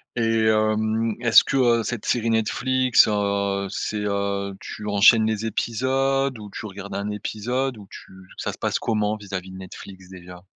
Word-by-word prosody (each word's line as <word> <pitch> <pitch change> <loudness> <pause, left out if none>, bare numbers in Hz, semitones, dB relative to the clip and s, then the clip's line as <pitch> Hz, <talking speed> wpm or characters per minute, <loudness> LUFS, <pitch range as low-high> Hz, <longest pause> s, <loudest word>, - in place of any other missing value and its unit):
Et 115 -1 +1
hem, 110 +1 +1
est-ce 115 -2 +6
que - - -3
heu, 120 -3 +3
cette 115 +1 -4
série 115 -1 0
Netflix 130 +3 +3
heu, 100 -1 -1
c'est 105 +1 -3
heu, 100 -1 -2
tu 105 - -8
enchaînes 110 +2 +5
les 110 0 -2
épisodes, 130 +3 0
ou 105 -1 -9
tu 110 - -7
regardes 100 0 -8
un 100 +1 -3
épisode, 125 +5 -3
ou 100 -2 -13
tu - - -12 0.3
ça - - -3
se - - -11
passe - - -1
comment 105 -1 -1
vis-à-vis 95 -3 -7
de 95 - -9
Netflix 95 0 -11
déjà? 90 -1 -12
110 Hz, 170 wpm, -23 LUFS, 100-115 Hz, 0.3 s, est-ce